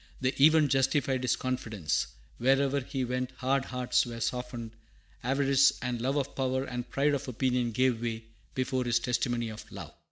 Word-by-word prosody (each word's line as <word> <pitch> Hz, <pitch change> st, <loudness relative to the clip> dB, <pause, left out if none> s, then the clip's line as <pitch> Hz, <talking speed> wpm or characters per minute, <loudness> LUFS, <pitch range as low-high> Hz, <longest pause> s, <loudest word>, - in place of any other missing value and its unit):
The 130 Hz, 0 st, +1 dB
event 155 Hz, -2 st, +6 dB
justified 135 Hz, -1 st, +2 dB
his 125 Hz, -2 st, +2 dB
confidence; 110 Hz, -, -2 dB, 0.3 s
wherever 135 Hz, +2 st, +3 dB
he 130 Hz, 0 st, -3 dB
went 125 Hz, +1 st, -2 dB
hard 135 Hz, +1 st, +1 dB
hearts 125 Hz, -1 st, +1 dB
were 120 Hz, -2 st, -6 dB
softened, 125 Hz, -1 st, -3 dB, 0.5 s
avarice 135 Hz, +1 st, +4 dB
and 125 Hz, -2 st, -3 dB
love 135 Hz, +3 st, 0 dB
of 140 Hz, -1 st, -2 dB
power 130 Hz, 0 st, 0 dB
and 125 Hz, -2 st, -5 dB
pride 145 Hz, +1 st, +2 dB
of 140 Hz, -, -2 dB
opinion 125 Hz, -1 st, 0 dB
gave 125 Hz, 0 st, +1 dB
way 115 Hz, -1 st, -3 dB, 0.3 s
before 130 Hz, 0 st, 0 dB
his 120 Hz, -1 st, +2 dB
testimony 120 Hz, -1 st, -1 dB
of 110 Hz, 0 st, -10 dB
love. -, -, -8 dB
130 Hz, 165 wpm, -29 LUFS, 120-135 Hz, 0.5 s, event